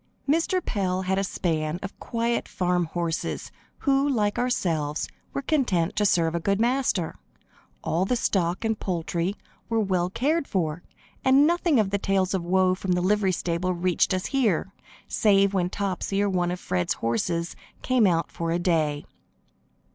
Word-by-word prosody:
Mr. 335 +5 +1
Pell 190 -3 -1
had 190 +1 0
a - - 0
span 160 -4 -1
of 195 - -7
quiet 235 0 -1
farm 180 -1 0
horses, 165 0 -3 0.3
who, 275 0 +2
like 210 -6 +1
ourselves, 165 -12 0 0.2
were 275 - -3
contented 240 - +1
to 210 -1 +3
serve 165 -3 +2
a 170 - 0
good 200 +4 0
master. 240 -8 0 0.6
All 165 +4 0
the 250 - +1
stock 185 -4 0
and 220 -1 0
poultry 175 +1 -2 0.3
were 225 0 +1
well 185 -4 +1
cared 285 - 0
for, 165 -3 -1 0.4
and 270 +2 +6
nothing 340 -4 +2
of 200 -3 +1
the 200 - 0
tales 195 -1 +1
of 190 -3 -1
woe 185 +1 +3
from 185 0 -1
the 180 - +1
livery 195 +1 +2
stable 180 +1 -1
reached 180 +2 +1
us 185 -1 -1
here, 215 - 0 0.3
save 200 -2 +3
when 180 -2 +1
Topsy 195 0 -2
or 205 - +1
one 175 -1 +1
of 180 0 -3
Fred's 90 - -1
horses 170 +9 -1 0.3
came 250 -5 +3
out 165 -3 0
for 165 0 -3
a 165 - +1
day. 155 -4 0
185 Hz, 165 wpm, -25 LUFS, 170-220 Hz, 0.6 s, and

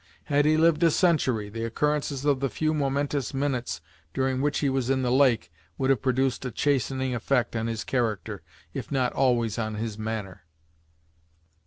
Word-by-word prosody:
Had 145 -1 +2
he 155 +1 +4
lived 160 0 +4
a 170 - +6
century, 140 - +2
the 115 +2 -5
occurrences 145 +3 -1
of 140 -3 +3
the 135 0 0
few 155 +3 0
momentous 140 -1 -1
minutes 135 - -2 0.3
during 130 -1 0
which 145 +1 +1
he 145 - +1
was 135 -2 0
in 130 -1 +1
the 125 - +1
lake 130 -8 +3 0.3
would 135 0 +2
have 130 - +1
produced 130 0 0
a 130 - -2
chastening 130 0 0
effect 120 0 0
on 115 0 -1
his 115 -1 -3
character, 110 -5 -2 0.3
if 135 -3 -6
not 130 -3 +1
always 120 -4 +1
on 110 -1 -2
his 110 0 -4
manner. 110 -6 -5
130 Hz, 175 wpm, -26 LUFS, 115-140 Hz, 0.3 s, a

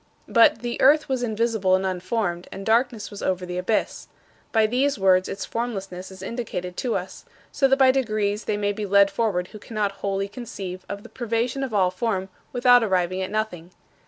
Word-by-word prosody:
But 230 0 +4
"the 240 -1 -3
earth 300 +3 +5
was 260 -2 -1
invisible 220 -4 +1
and 190 +1 -1
unformed, 185 -1 -2
and 195 +1 -7
darkness 230 -1 +1
was 205 - -8
over 185 -1 -1
the 180 0 -4
abyss." 210 +4 -1 0.4
By 220 -1 +4
these 260 +5 +1
words 185 -1 +3
its 195 - -4
formlessness 195 -6 -4
is 190 0 -11
indicated 190 -6 -4
to 245 -3 -1
us - - -5 0.3
so 275 - +3
that 270 0 +3
by 265 -1 +6
degrees 215 -5 -1
they 210 - -1
may 205 0 0
be 210 0 -4
led 200 0 +5
forward 190 -6 -1
who 215 - -11
cannot 210 -2 -2
wholly 195 0 -1
conceive 200 -5 -7
of 200 0 -6
the - - -12
privation 240 +2 -2
of 265 - -3
all 190 -4 +2
form 190 -1 -2 0.2
without 245 -1 +5
arriving 185 -2 0
at 185 - -3
nothing. 190 -5 -3
210 Hz, 190 wpm, -24 LUFS, 190-235 Hz, 0.4 s, by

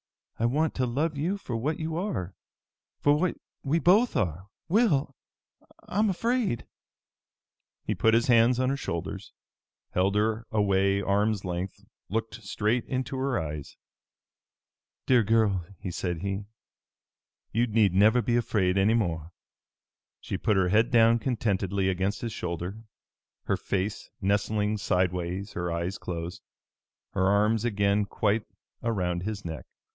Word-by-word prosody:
I 115 - +3
want 150 +5 +1
to 130 -1 0
love 150 +6 -1
you 170 +8 -1
for 125 -11 -5
what 145 +7 -1
you 160 0 -3
are, 165 - -3 0.7
for 145 - +4
what 175 +4 0 0.3
we 145 +4 +1
both 200 +8 +4
are, 90 0 -1 0.2
Will! 160 - +2 0.7
I'm 210 +2 +1
afraid!" 230 - 0 1.2
He - - 0
put 110 0 +3
his 115 - +3
hands 120 0 +4
on 130 0 +2
her - - 0
shoulders, 95 -3 -5 0.6
held 95 +2 +1
her 110 +2 0
away 100 -2 +2
arms' 100 +1 +1
length, 90 +1 -4 0.2
looked 115 +3 -3
straight 110 +4 0
into 130 +1 -3
her 130 -1 0
eyes. 75 -2 -5 1.3
"Dear 125 -2 +5
girl," 110 -4 +2 0.3
said 85 -1 -3
he, 100 0 -2 1.1
"you 120 +2 +2
need 105 -4 +3
never 110 +5 +5
be 120 - +1
afraid 100 -5 +1
any 105 +4 +4
more." 85 -7 -1 0.9
She - - -5
put 105 - +2
her 95 -1 +3
head 110 +5 +3
down 115 -1 +5
contentedly 100 -5 0
against 95 +2 -1
his 115 -3 -3
shoulder, 90 +4 -4 0.6
her - - 0
face 100 +2 -3
nestling 105 +1 0
sidewise, 90 +1 -1
her 85 0 -2
eyes 85 +3 -2
closed, 85 0 -5 0.7
her 95 -1 +1
arms 105 +2 +3
again 100 -2 +2
quite 105 +1 0 0.3
around 90 -7 -1
his 105 +1 -4
neck. 80 -2 -6
105 Hz, 135 wpm, -27 LUFS, 95-120 Hz, 1.3 s, Dear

